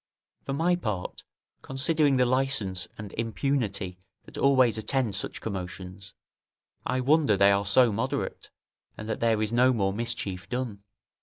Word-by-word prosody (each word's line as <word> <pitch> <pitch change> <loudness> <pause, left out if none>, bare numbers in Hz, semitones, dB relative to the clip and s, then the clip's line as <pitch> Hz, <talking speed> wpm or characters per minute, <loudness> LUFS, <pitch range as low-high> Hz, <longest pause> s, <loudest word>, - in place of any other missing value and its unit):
For 135 - -4
my 170 +5 +2
part, 105 - -4 0.4
considering 140 +1 +1
the 125 - +4
licence 125 -8 +1
and 105 -2 -8
impunity 110 -6 -2 0.2
that - - -14
always 130 -5 +3
attend 115 0 0
such - - -3
commotions, 95 -1 -7 0.7
I 130 0 0
wonder 140 -5 +3
they 100 +1 +6
are 100 0 +1
so 120 +3 +5
moderate, 130 +7 -3 0.5
and 110 - -7
that 110 - -3
there 110 -2 +2
is 110 - -2
no 125 +2 +5
more 95 -4 0
mischief 105 -5 -3
done. 120 -5 -4
115 Hz, 145 wpm, -27 LUFS, 100-135 Hz, 0.7 s, they